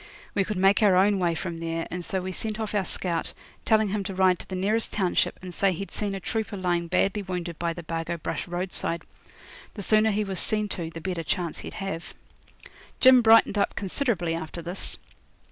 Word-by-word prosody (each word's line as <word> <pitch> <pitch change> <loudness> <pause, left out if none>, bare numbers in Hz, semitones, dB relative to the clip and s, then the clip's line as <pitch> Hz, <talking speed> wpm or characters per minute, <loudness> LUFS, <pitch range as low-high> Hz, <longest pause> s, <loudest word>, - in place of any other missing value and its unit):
We 195 - +2
could 210 +1 -3
make 195 +2 +4
our 200 -3 +5
own 195 +2 +4
way 170 -2 +1
from 170 -1 -4
there, 165 0 -3
and 180 0 -4
so 190 +2 -2
we 185 - -3
sent 215 +3 -3
off 220 -1 -3
our 205 -2 +1
scout, 170 -3 -1 0.3
telling 220 -2 +3
him 205 0 -1
to 195 -1 -4
ride 185 -1 +4
to - - -10
the 190 - -4
nearest 210 +5 +1
township 190 -4 +1
and 180 -1 -7
say 195 +2 +2
he'd 195 +3 -6
seen 205 -2 -2
a - - -4
trooper 220 +1 -3
lying 175 -2 0
badly 190 +3 +1
wounded 180 -3 -5
by 170 -1 0
the 175 - -8
Bargo 165 +1 -3
Brush 165 - -4
roadside. 175 -1 -2 0.7
The 205 - -5
sooner 215 +2 +4
he 210 0 +1
was 190 -3 -2
seen 210 -1 +2
to, 170 -5 -3
the 165 0 -8
better 180 -1 -2
chance 170 0 -2
he'd - - -8
have. 195 -4 -5 0.8
Jim 260 -1 +8
brightened 225 -2 +6
up 200 - +1
considerably 195 - -1
after 165 +1 -5
this. 175 +3 -2
190 Hz, 210 wpm, -26 LUFS, 170-205 Hz, 0.8 s, Jim